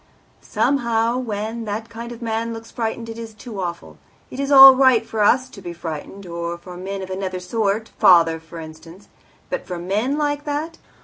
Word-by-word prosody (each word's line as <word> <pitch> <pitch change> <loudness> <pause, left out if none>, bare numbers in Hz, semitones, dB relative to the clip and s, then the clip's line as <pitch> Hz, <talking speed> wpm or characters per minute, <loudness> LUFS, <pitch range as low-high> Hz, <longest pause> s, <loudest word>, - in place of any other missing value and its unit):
"Somehow, 235 -3 0
when 225 -1 -4
that 215 +2 -4
kind 230 +1 -8
of 240 0 -9
man 230 0 -2
looks 225 0 -10
frightened 230 0 -3
it 225 0 -7
is 225 -2 -8
too 210 -2 -7
awful. 170 -1 -6 0.3
It 255 - -8
is 280 0 -1
all 270 -1 +11
right 260 -4 +4
for 225 - -5
us 250 +5 +4
to 200 - -12
be 175 -2 -6
frightened, 170 +4 -7
or 170 0 -4
for 180 +1 -11
men 195 +2 -5
of 190 - -8
another 185 -1 -3
sort 215 +3 -1
father, 165 -3 +5
for 165 +1 -11
instance; 165 +4 -12 0.4
but - - -3
for 180 - -4
men 210 +11 -1
like 290 -1 -1
that! 310 +3 -4
220 Hz, 190 wpm, -21 LUFS, 180-235 Hz, 0.4 s, all